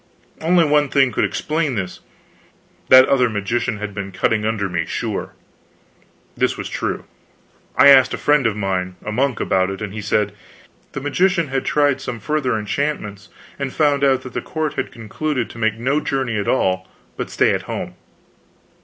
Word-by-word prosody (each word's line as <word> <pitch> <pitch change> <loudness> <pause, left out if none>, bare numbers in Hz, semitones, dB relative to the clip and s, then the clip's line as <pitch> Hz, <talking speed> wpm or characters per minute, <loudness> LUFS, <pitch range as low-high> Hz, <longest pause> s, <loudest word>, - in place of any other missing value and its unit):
Only 170 +1 +4
one 150 -1 +3
thing 135 -2 +3
could - - +1
explain 155 -4 -1
this: 95 -3 -4 0.9
that 130 0 +9
other 125 -3 +3
magician 110 +3 -1
had 105 0 -5
been 100 -1 -5
cutting 105 +3 0
under 105 -3 -1
me, 90 -2 -1
sure. - - -4 1.0
This - - 0
was - - -5
true. - - -3 0.7
I 140 - +7
asked 130 -2 +7
a - - -2
friend 145 -4 +3
of 110 - -1
mine, 95 -2 -2
a 105 - -3
monk, 130 +2 0
about 95 0 +1
it, 95 -1 -5
and 105 -2 -5
he 105 - -5
said, 105 0 +1
yes, 105 - -24 0.6
the 135 - -4
magician 170 +2 +1
had 135 0 -2
tried 145 -2 +2
some 120 - -5
further 130 0 0
enchantments 105 -2 -3 0.3
and 140 -2 -2
found 145 -2 +2
out 135 -2 +3
that 130 - -9
the - - -2
court 155 -2 -3
had - - -3
concluded 120 +3 -3
to 120 - -11
make 110 -1 +1
no 135 +6 +1
journey 135 -6 -2
at 100 - -3
all, 95 -6 +1 0.3
but - - -4
stay - - +2
at - - -1
home. - - -4
125 Hz, 180 wpm, -20 LUFS, 105-140 Hz, 1.0 s, that